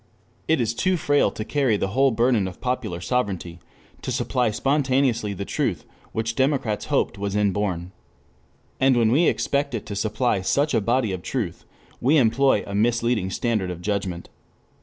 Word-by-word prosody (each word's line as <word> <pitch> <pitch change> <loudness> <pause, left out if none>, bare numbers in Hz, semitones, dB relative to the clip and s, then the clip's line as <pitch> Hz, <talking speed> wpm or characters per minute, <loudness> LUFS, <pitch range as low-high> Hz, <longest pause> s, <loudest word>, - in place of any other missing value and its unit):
It 160 -2 +3
is 115 -2 0
too 185 +8 +1
frail 145 -2 +2
to 110 - -6
carry 130 -5 +1
the 95 - -1
whole 135 +6 +3
burden 115 -3 +2
of 90 - -9
popular 125 -8 -2
sovereignty, 95 -7 -2 0.4
to - - -4
supply 125 -1 0
spontaneously 130 -3 +1
the 100 +1 -5
truth - - -2 0.3
which 115 +1 -2
democrats 130 -4 0
hoped - - 0
was 100 0 -2
inborn. 100 -3 0 0.9
And 130 -1 +4
when 115 -2 +3
we 160 +7 +4
expect 140 -2 0
it 110 - -5
to 100 - -6
supply 110 0 0
such 140 +10 +1
a 115 - +3
body 115 0 +1
of 95 -1 -4
truth 100 -6 -4 0.3
we 140 +6 +3
employ 125 -2 +3
a 100 - -7
misleading 115 -1 +1
standard 105 -1 -1
of 90 -2 -5
judgment. 95 -2 -3
115 Hz, 165 wpm, -23 LUFS, 100-130 Hz, 0.9 s, And